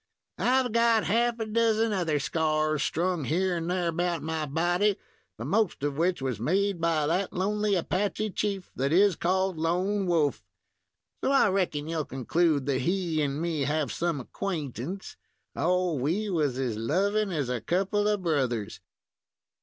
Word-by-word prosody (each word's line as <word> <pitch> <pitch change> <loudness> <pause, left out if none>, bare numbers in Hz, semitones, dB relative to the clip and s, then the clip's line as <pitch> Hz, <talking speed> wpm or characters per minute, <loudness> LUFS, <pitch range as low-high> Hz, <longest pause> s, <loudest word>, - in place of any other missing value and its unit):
"I've 255 -1 +2
got 230 -1 +3
half 235 +3 +1
a 225 - -1
dozen 225 0 +2
other 165 -6 0
scars 155 0 0
strung 175 +1 0
here 180 +4 +1
and 165 0 -3
there 180 -1 0
about 170 -1 -1
my 160 -1 -2
body, 175 +7 +1 0.4
the - - -6
most 205 -8 0
of 145 -1 -1
which 170 -1 0
was 125 -5 -2
made 190 - 0
by 160 -2 +2
that 180 +5 0
lonely 205 +2 0
Apache 205 +4 -1
chief 195 -2 -3
that 135 +2 0
is 195 +2 +5
called 185 +1 0
Lone 185 +5 0
Wolf; 160 -5 +1 0.8
so - - +2
I 275 -6 +5
reckon 175 -6 -1
you'll 160 -2 -2
conclude 145 +2 +1
that 135 -2 0
he 170 0 0
and 140 0 -1
me 165 -2 -1
have 145 -2 0
some 170 0 -1
acquaintance. 155 - -5 0.4
Oh! 180 +2 +1
we 170 +10 -1
was 150 -7 0
as 125 -5 -2
lovin' 200 - +1
as 145 -7 -1
a 125 -2 -2
couple 195 - 0
of 210 -3 0
brothers!" 130 - -1
175 Hz, 160 wpm, -27 LUFS, 150-195 Hz, 0.8 s, is